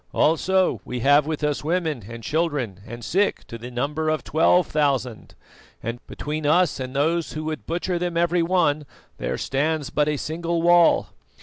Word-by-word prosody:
Also 185 Hz, +4 st, +2 dB
we 125 Hz, -1 st, -5 dB
have 145 Hz, +3 st, +4 dB
with 155 Hz, -1 st, -3 dB
us 150 Hz, -1 st, 0 dB
women 160 Hz, -, -1 dB
and 115 Hz, 0 st, -8 dB
children 145 Hz, -, -1 dB
and 120 Hz, 0 st, -8 dB
sick 200 Hz, +3 st, 0 dB
to 115 Hz, -, -9 dB
the 120 Hz, +2 st, -7 dB
number 150 Hz, +6 st, -2 dB
of 155 Hz, 0 st, -1 dB
twelve 170 Hz, +2 st, +3 dB
thousand, 135 Hz, -7 st, -1 dB, 0.5 s
and 115 Hz, +2 st, -4 dB
between 155 Hz, +1 st, -4 dB
us 165 Hz, +2 st, +3 dB
and 130 Hz, 0 st, -5 dB
those 160 Hz, +4 st, 0 dB
who 155 Hz, -, -4 dB
would 155 Hz, 0 st, -5 dB
butcher 175 Hz, +1 st, -1 dB
them 175 Hz, -1 st, -2 dB
every 170 Hz, +1 st, +2 dB
one 165 Hz, -4 st, +1 dB, 0.3 s
there -, -, -2 dB
stands 150 Hz, +1 st, -1 dB
but 150 Hz, 0 st, +1 dB
a 150 Hz, -, 0 dB
single 165 Hz, +3 st, -2 dB
wall. 175 Hz, -1 st, +5 dB
155 Hz, 175 wpm, -23 LUFS, 140-170 Hz, 0.5 s, wall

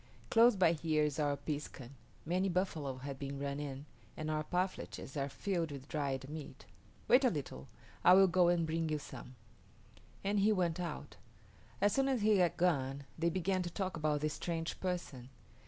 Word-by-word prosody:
Close 235 Hz, 0 st, +6 dB
by 180 Hz, -4 st, +4 dB
here 155 Hz, -2 st, +1 dB
is 150 Hz, 0 st, -1 dB
our 145 Hz, -1 st, +1 dB
piskun. 145 Hz, -4 st, -5 dB, 0.3 s
Many 185 Hz, +4 st, +1 dB
buffalo 160 Hz, -7 st, -1 dB
have 135 Hz, +1 st, -6 dB
been 140 Hz, 0 st, -4 dB
run 140 Hz, 0 st, -3 dB
in, 140 Hz, -1 st, -5 dB, 0.3 s
and 155 Hz, 0 st, -3 dB
our 155 Hz, 0 st, 0 dB
parfleches 180 Hz, -4 st, -3 dB
are 140 Hz, -1 st, -1 dB
filled 170 Hz, +2 st, -2 dB
with 140 Hz, -1 st, -8 dB
dried 140 Hz, -3 st, -2 dB
meat. 150 Hz, 0 st, -8 dB, 0.4 s
Wait 250 Hz, +3 st, +6 dB
a 255 Hz, -, +5 dB
little; 130 Hz, -, -5 dB, 0.4 s
I 180 Hz, -, +8 dB
will 195 Hz, 0 st, +8 dB
go 180 Hz, -1 st, +4 dB
and 175 Hz, -1 st, +3 dB
bring 160 Hz, 0 st, -1 dB
you 155 Hz, -, 0 dB
some," 130 Hz, -3 st, -10 dB, 0.9 s
and 200 Hz, +1 st, +1 dB
he 205 Hz, +2 st, +4 dB
went 180 Hz, -4 st, +1 dB
out. 165 Hz, -5 st, -5 dB, 0.6 s
As 205 Hz, +1 st, +3 dB
soon 270 Hz, 0 st, +2 dB
as 260 Hz, -4 st, +1 dB
he 215 Hz, -1 st, +5 dB
had 175 Hz, -3 st, +2 dB
gone 140 Hz, -6 st, +1 dB, 0.2 s
they 170 Hz, +1 st, +2 dB
began 185 Hz, +2 st, 0 dB
to 175 Hz, -, -3 dB
talk 190 Hz, +2 st, -3 dB
about 150 Hz, -2 st, 0 dB
this 155 Hz, -1 st, 0 dB
strange 165 Hz, -1 st, -3 dB
person. 170 Hz, -9 st, -4 dB
160 Hz, 185 wpm, -34 LUFS, 140-185 Hz, 0.9 s, I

